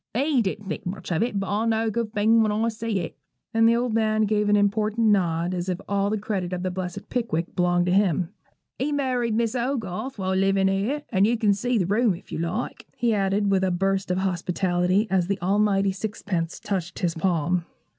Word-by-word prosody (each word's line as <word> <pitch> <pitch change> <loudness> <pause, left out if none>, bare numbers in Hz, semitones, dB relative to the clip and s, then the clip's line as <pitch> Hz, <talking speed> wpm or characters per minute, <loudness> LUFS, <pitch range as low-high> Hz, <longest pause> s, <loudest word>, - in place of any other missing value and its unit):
He 275 +1 +2
didn't 205 0 -3
think 190 - -4
much 185 0 -5
of 170 - +1
it; 225 -3 0
but 195 - -3
I 205 +3 0
know 225 0 +1
a 220 - 0
good 230 0 -2
thing 225 +1 +4
when 215 -1 +2
I 220 +2 +1
see 220 -3 -2
it;' 170 - -6 0.4
and 225 0 +5
the 230 - +4
old 240 -1 0
man 220 -1 +2
gave 210 0 +1
an 205 - +5
important 215 +2 +2
nod, 175 -3 +1
as 180 0 -3
if 180 0 -2
all 200 0 +1
the 215 - 0
credit 195 -4 -3
of 180 0 -3
the 185 - -1
blessed 185 +1 -5
'Pickwick' 200 -9 -2
belonged 175 -1 +2
to 180 - +1
him. 185 -3 +2 0.5
'He 275 +4 0
married 250 -5 0
Miss 230 -1 +1
Hogarth 245 -1 -3
while 190 -1 -1
livin' 195 0 +3
here; 215 +10 -1
and 195 -1 +4
you 235 +1 +1
can 210 -2 +3
see 240 +5 0
the 185 - +1
room, 210 +1 +2
if - - -15
you - - -3
like,' 170 +9 -3
he 240 -2 +2
added, 200 0 +1
with 190 -1 +2
a 190 - +2
burst 195 +2 0
of 180 - +1
hospitality, 180 +1 +1
as 185 -2 +2
the 200 0 -1
almighty 195 +1 +2
sixpence 190 -4 -3
touched 190 -3 -3
his 175 -3 0
palm. 170 0 0
200 Hz, 220 wpm, -25 LUFS, 185-225 Hz, 0.5 s, and